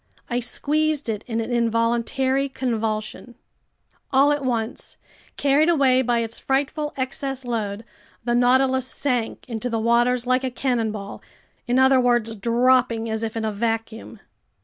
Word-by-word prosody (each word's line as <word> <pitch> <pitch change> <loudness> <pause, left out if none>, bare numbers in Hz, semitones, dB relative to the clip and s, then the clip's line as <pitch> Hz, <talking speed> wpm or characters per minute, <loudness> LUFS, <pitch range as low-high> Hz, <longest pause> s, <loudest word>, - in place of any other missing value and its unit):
I 240 - +1
squeezed 300 +3 0
it 210 -2 -3
in 230 -2 -2
an 225 - -5
involuntary 235 +4 +1
convulsion. 225 -2 -3 0.8
All 275 +2 +5
at 290 -1 -1
once, 235 -3 -3 0.4
carried 285 +3 +3
away 270 -6 +4
by 240 -2 +1
its 225 0 -5
frightful 285 +2 -1
excess 265 0 -3
load, 220 -2 -3 0.4
the 240 - +1
Nautilus 260 +1 +3
sank 250 -4 -2
into 235 0 -4
the 230 - -1
waters 235 +2 +2
like 255 +1 +1
a 260 - 0
cannonball, 225 -6 -3 0.5
in 245 +1 +1
other 265 0 +5
words, 240 -2 +2
dropping 235 +1 +2
as 220 0 -2
if 225 0 -3
in 220 - -2
a 215 - -1
vacuum! 225 +1 -3
245 Hz, 145 wpm, -23 LUFS, 225-260 Hz, 0.8 s, All